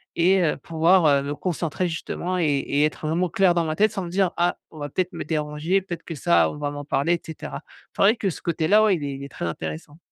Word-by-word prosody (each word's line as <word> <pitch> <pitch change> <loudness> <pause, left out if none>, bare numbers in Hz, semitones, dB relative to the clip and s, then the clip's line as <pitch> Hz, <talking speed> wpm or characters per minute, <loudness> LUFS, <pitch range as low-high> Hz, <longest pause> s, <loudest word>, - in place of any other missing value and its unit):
et 185 +3 +4
heu, 155 - +1
pouvoir, 165 +2 +3
heu, 140 -2 +4
me 145 +1 -3
concentrer 175 0 -2
justement 175 +2 -3
et - - +1
et 145 0 +1
être 155 - -4
vraiment 175 +3 0
clair 185 +1 +3
dans 170 -1 +1
ma 155 0 -2
tête, 215 0 +4
sans 195 - -3
me - - -6
dire: 185 0 +1
«Ah 175 +1 +1
on 155 - -12
va 145 0 -4
peut-être 185 +5 -2
me 170 - -4
déranger, 155 +4 -1
peut-être 175 -3 -7
que 165 - -6
ça 85 - +3
on - - -9
va 145 -1 -3
m'en 145 0 -6
parler 145 +3 +1
et 170 - -1
cetera». 160 - -7 0.3
C'est - - -3
vrai 210 +4 +6
que 200 - 0
ce - - -9
côté-là, 170 +5 +3
ouais, 210 -3 +4
il 155 - -5
est 140 - -3
il 140 - -8
est 140 - -7
très - - -5
intéressant. 80 - -6
165 Hz, 265 wpm, -24 LUFS, 145-180 Hz, 0.3 s, vrai